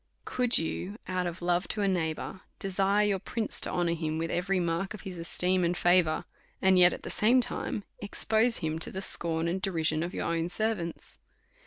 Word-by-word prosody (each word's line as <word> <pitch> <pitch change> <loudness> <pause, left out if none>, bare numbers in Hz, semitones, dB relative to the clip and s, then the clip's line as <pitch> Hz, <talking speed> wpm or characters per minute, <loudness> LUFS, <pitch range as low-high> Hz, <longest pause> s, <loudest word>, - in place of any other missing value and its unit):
Could 250 -1 +3
you 180 +5 -3
out 185 -1 -1
of 175 +1 -6
love 175 +1 +1
to 210 - -1
a - - +2
neighbour 175 0 -2 0.2
desire 195 +2 +1
your 200 -2 +1
prince 225 +4 -3
to - - 0
honour 175 -1 +1
him 160 -1 -2
with 165 +1 -2
every 185 +2 0
mark 170 +4 -1
of 215 - -12
esteem 180 0 0
and 175 +1 +1
favour, 175 -3 +3 0.3
and 190 -1 +4
yet 175 0 +8
at - - -6
the - - -5
same 235 +5 +4
time 225 -3 -3 0.2
expose 220 +3 +1
him 160 0 -2
to - - +4
the 190 +1 -5
scorn 165 -2 -2
and 185 +3 -1
derision 160 -5 0
of 175 +3 -4
your - - -2
own 170 0 -1
servants? 195 -3 -2
180 Hz, 195 wpm, -29 LUFS, 170-195 Hz, 0.3 s, yet